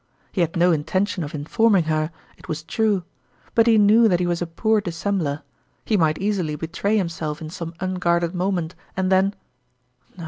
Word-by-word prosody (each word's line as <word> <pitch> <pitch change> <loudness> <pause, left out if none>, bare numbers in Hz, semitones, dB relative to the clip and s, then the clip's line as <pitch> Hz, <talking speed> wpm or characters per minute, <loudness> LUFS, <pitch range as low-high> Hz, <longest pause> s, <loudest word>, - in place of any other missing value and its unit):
He 185 - -1
had 170 -1 0
no 175 +1 +4
intention 180 +4 0
of 150 +2 -6
informing 195 +6 +2
her, 155 0 0 0.3
it - - -16
was 155 0 -4
true; 210 0 0 0.5
but 230 0 +4
he 225 -1 +6
knew 215 +2 +6
that 180 -4 +2
he 180 - +1
was 175 0 -1
a 175 - -1
poor 220 +6 +1
dis 175 -5 -6
sembler 160 -8 -1 0.4
he 220 - +1
might 160 -5 +2
easily 190 -6 -1
betray 175 +7 -1
himself 165 -5 -2
in 155 -1 -7
some 170 -1 -6
unguarded 175 -2 0
moment, 180 -2 -1 0.2
and 190 0 0
then 190 +2 +3 0.8
No - - -13
175 Hz, 185 wpm, -22 LUFS, 160-200 Hz, 0.8 s, he